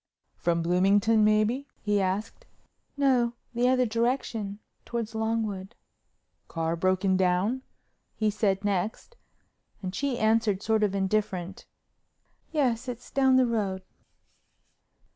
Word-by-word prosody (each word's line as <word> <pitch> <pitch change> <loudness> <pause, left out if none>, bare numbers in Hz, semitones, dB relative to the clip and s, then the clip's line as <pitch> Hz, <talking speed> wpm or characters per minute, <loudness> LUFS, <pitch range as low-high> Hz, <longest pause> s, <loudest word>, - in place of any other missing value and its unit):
"From 170 -1 0
Bloomington 200 +5 +3
maybe?" 215 +6 +2
he 205 -1 +1
asked. 195 - -3 0.5
"No, 255 -4 +3 0.2
the 245 +1 +2
other 255 -1 +3
direction—toward 230 -1 -3
Longwood." 220 -2 -2 0.7
"Car 165 0 -2
broken 185 +2 +1
down?" 190 +7 +1 0.5
he 215 -1 +1
said 200 -1 0
next, 205 - -2 0.7
and 185 0 -4
she 275 +2 -1
answered 220 -3 +2
sort 220 0 +2
of 205 -2 +1
indifferent, 190 -2 -2 0.8
"Yes, 255 -5 0
it's 245 -1 -7
down 265 -1 +4
the 260 -1 +5
road." 200 -5 -1
215 Hz, 105 wpm, -27 LUFS, 190-235 Hz, 0.8 s, the